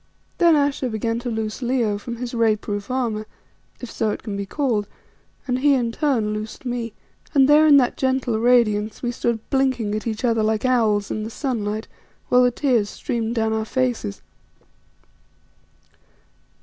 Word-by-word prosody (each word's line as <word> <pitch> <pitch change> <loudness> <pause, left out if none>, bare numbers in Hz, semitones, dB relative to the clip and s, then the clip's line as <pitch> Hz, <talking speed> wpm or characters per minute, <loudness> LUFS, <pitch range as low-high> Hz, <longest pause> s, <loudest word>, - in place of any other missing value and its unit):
Then 340 -2 +6
Ayesha 280 -3 +1
began 230 +1 -2
to 245 0 -4
loose 220 +1 -3
Leo 235 -5 0
from 235 +3 -6
his 245 +1 -6
ray 225 -2 +3
proof 205 0 -5
armour, 230 -4 -2 0.5
if 245 - -7
so 220 - -1
it - - -4
can 210 -3 -4
be 200 0 -4
called, 230 -6 -1 0.6
and 250 -2 -1
he 285 +1 +4
in 240 -3 0
turn 230 -6 0
loosed 215 +4 -6
me; 240 -3 -3 0.4
and 270 -1 +6
there 300 +2 +6
in 290 -2 +8
that 250 -3 +2
gentle 260 -4 0
radiance 220 -3 +2
we 240 - 0
stood 235 -2 -2
blinking 260 -6 +1
at 215 +1 -3
each 220 +2 -2
other 230 -2 +2
like 215 +2 0
owls 220 -5 +2
in 215 - -2
the 220 - -5
sunlight, 220 -4 -3 0.4
while 250 - +5
the 250 - +5
tears 240 -5 +1
streamed 230 0 -3
down 220 -1 +1
our 220 0 0
faces. 245 - -2
235 Hz, 170 wpm, -22 LUFS, 215-255 Hz, 0.6 s, in